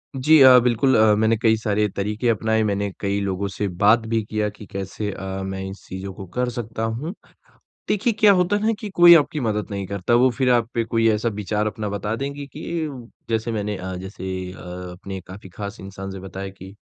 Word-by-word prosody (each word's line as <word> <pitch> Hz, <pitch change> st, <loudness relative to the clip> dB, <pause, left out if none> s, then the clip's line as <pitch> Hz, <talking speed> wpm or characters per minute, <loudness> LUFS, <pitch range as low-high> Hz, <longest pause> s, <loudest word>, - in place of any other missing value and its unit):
जी 150 Hz, +4 st, +5 dB
अ, 130 Hz, -1 st, +9 dB
बिल्कुल। 125 Hz, +2 st, +3 dB
अ, 110 Hz, -1 st, +5 dB
मैंने 110 Hz, +1 st, +2 dB
कई 110 Hz, -1 st, +4 dB
सारे 105 Hz, -1 st, 0 dB
तरीक़े 105 Hz, +4 st, -2 dB
अपनाए, 110 Hz, 0 st, +1 dB
मैंने 100 Hz, -1 st, -1 dB
कई 100 Hz, 0 st, -1 dB
लोगों 100 Hz, 0 st, -2 dB
से 100 Hz, +1 st, -3 dB, 0.2 s
बात 110 Hz, +3 st, +6 dB
भी 115 Hz, 0 st, +1 dB
किया 105 Hz, 0 st, -2 dB
कि 105 Hz, +1 st, -12 dB
कैसे 100 Hz, +1 st, -4 dB
अ, 95 Hz, 0 st, -5 dB
मैं 95 Hz, 0 st, -4 dB
इन 95 Hz, -, -5 dB
चीज़ों 95 Hz, -1 st, -8 dB
को 95 Hz, -, -9 dB
कर 125 Hz, 0 st, 0 dB
सकता 115 Hz, -2 st, -5 dB
हूँ। 120 Hz, +10 st, -3 dB, 0.8 s
देखिए 215 Hz, +3 st, +1 dB
क्या 210 Hz, -1 st, +7 dB
होता 180 Hz, +1 st, +2 dB
है 205 Hz, -, -4 dB
ना 225 Hz, -, +3 dB
कि 210 Hz, -, -6 dB
कोई 175 Hz, 0 st, +9 dB
आपकी 150 Hz, -1 st, +2 dB
मदद 105 Hz, -2 st, -2 dB
नहीं 100 Hz, -1 st, -3 dB
करता। 100 Hz, +3 st, -1 dB
वो 125 Hz, +2 st, +5 dB
फिर 130 Hz, 0 st, 0 dB
आप 120 Hz, -2 st, +2 dB
पे 115 Hz, -, +1 dB
कोई 115 Hz, 0 st, +1 dB
ऐसा 110 Hz, +2 st, 0 dB
विचार 105 Hz, 0 st, -2 dB
अपना 105 Hz, -1 st, -4 dB
बता 100 Hz, +2 st, -2 dB
देंगे 140 Hz, +3 st, -5 dB
कि -, -, -10 dB, 0.7 s
जैसे 115 Hz, +1 st, -1 dB
मैंने 105 Hz, -2 st, -2 dB
अ, 95 Hz, 0 st, -5 dB
जैसे 95 Hz, 0 st, -6 dB
अ, -, -, -13 dB, 0.3 s
अपने 95 Hz, +2 st, -7 dB
काफ़ी 95 Hz, 0 st, -10 dB
ख़ास 100 Hz, +3 st, -7 dB
इंसान 95 Hz, 0 st, -7 dB
से 95 Hz, -, -7 dB
बताया 95 Hz, +1 st, -7 dB
कि, 95 Hz, 0 st, -12 dB
105 Hz, 215 wpm, -22 LUFS, 100-120 Hz, 0.8 s, अ